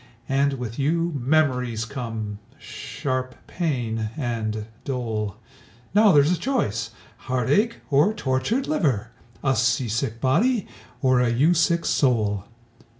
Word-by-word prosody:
And 140 +1 +2
with 120 -3 -5
you 165 +4 +1
memories 125 -5 +1
come, 110 -4 -5 0.2
sharp 130 -1 -4
pain, 120 -10 -2
and 110 -5 -2 0.2
dole. 110 -6 -3 0.6
Now 210 0 +6
there's 145 0 +5
a 180 - 0
choice 165 - -1 0.4
heartache 140 - +1
or 145 +9 +5
tortured 145 - 0
liver! 150 - 0 0.3
A 135 -1 +2
sea 125 +1 +1
sick 115 +1 -2
body, 205 - +2 0.4
or 130 -1 +4
a 125 -1 +3
you 140 +9 +3
sick 170 0 +2
soul! 105 -7 +1
130 Hz, 120 wpm, -24 LUFS, 115-155 Hz, 0.6 s, Now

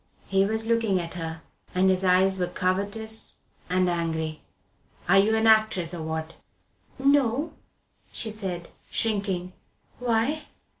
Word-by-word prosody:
He 195 0 +2
was 220 +2 0
looking 225 -4 +2
at 170 -1 -4
her, 165 -2 -5 0.3
and 185 +1 +4
his 190 0 +2
eyes 190 +1 +4
were 180 - +1
covetous 200 +5 0 0.3
and 185 0 +2
angry. 160 -2 -2 0.7
"Are 195 +3 +6
you 215 +3 +3
an 220 0 +2
actress, 215 -6 +3
or 170 - -5
what?" 160 0 -4 0.6
"No," 280 +2 +2 0.6
she 220 - -2
said, 185 -5 -4 0.2
shrinking. 195 -5 -1 0.5
"Why?" 245 +5 0
195 Hz, 130 wpm, -26 LUFS, 175-220 Hz, 0.7 s, Are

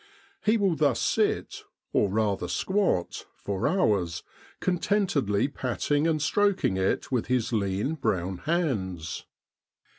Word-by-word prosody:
He 220 +1 +4
will 195 -5 +2
thus 145 -5 +2
sit, - - 0 0.3
or 100 - +3
rather 100 -3 0
squat, 190 - 0
for 100 -2 -2
hours, 100 - +1 0.4
contentedly 175 - +1
patting 145 +3 0
and 160 -2 +1
stroking 190 - +2
it 95 +6 0
with 125 -4 0
his 125 -1 0
lean 100 +6 0
brown 95 - -1
hands. 105 - -2
125 Hz, 115 wpm, -27 LUFS, -, 0.4 s, He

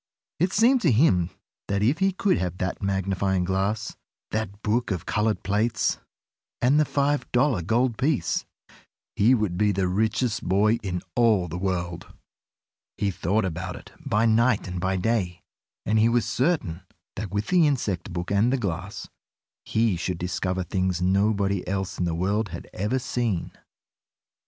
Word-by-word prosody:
It 180 +3 +2
seemed 240 +5 +4
to 165 - +3
him 95 - +3 0.4
that 100 0 0
if 135 +9 +2
he 195 0 +3
could 190 0 +1
have 90 -1 -3
that 90 -1 -3
magnifying 95 -1 0
glass, 95 +4 -1 0.4
that 105 -2 -3
book 115 +3 0
of 90 -5 -3
colored 105 +1 0
plates, 105 +1 0 0.6
and 135 +5 +4
the 155 - +4
five 145 +1 0
dollar 125 -5 +2
gold 115 +6 +1
piece, 140 0 +1 0.7
he 120 +6 +5
would 100 -6 -1
be 105 -1 +3
the 95 -1 0
richest 110 +4 0
boy 105 +5 +3
in 90 -3 -3
all 110 -7 +3
the 85 +2 -5
world! 90 -2 -3 0.9
He 100 -1 0
thought 95 +4 0
about 85 -1 -4
it - - -12
by 110 +2 +1
night 115 -1 +3
and 90 0 -4
by 95 +1 0
day, 90 -3 -1 0.4
and 110 +2 +2
he 110 +2 +5
was 120 -1 +2
certain 115 - 0 0.3
that 105 0 -4
with 105 +3 -2
the 175 -4 +5
insect 105 - -1
book 85 +1 -4
and 105 +5 +3
the 135 - +2
glass, 95 -3 -4 0.6
he 110 -3 +1
should 90 +1 -2
discover 90 +1 -2
things 95 -1 -1
nobody 100 +1 +1
else 95 0 -3
in 90 - +1
the 85 -1 -1
world 100 +5 0
had - - -8
ever 105 +7 -1
seen. 120 -7 -2
105 Hz, 160 wpm, -25 LUFS, 95-115 Hz, 0.9 s, he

